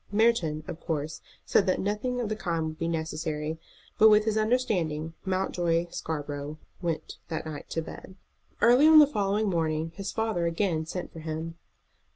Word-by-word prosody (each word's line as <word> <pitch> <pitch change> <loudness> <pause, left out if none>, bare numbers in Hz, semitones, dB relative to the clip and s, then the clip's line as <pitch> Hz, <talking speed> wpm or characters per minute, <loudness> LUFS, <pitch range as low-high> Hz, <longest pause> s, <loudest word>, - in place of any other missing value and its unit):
Merton, 205 -9 +2
of 160 - -6
course, 155 -2 -3 0.2
said 200 - +3
that 185 - +2
nothing 210 +5 -1
of 240 - -1
the 215 - -2
kind 170 -6 -1
would 155 0 -6
be 165 - -1
necessary; 160 -1 -3 0.4
but 220 - +9
with 210 0 +5
this 220 -1 +1
understanding 190 -9 0
Mountjoy 175 -3 0
Scarborough 145 -1 -4 0.2
went 165 -3 -3
that 160 -1 -4
night 155 -2 -7
to 165 - -2
bed. 185 - -10 0.5
Early 250 +6 +7
on 315 0 +8
the 300 - +10
following 210 -5 0
morning 160 -3 0
his 195 +2 -5
father 220 -7 0
again 165 -2 0
sent 180 +2 -5
for 165 - -8
him. 160 +1 -5
170 Hz, 170 wpm, -28 LUFS, 160-210 Hz, 0.5 s, the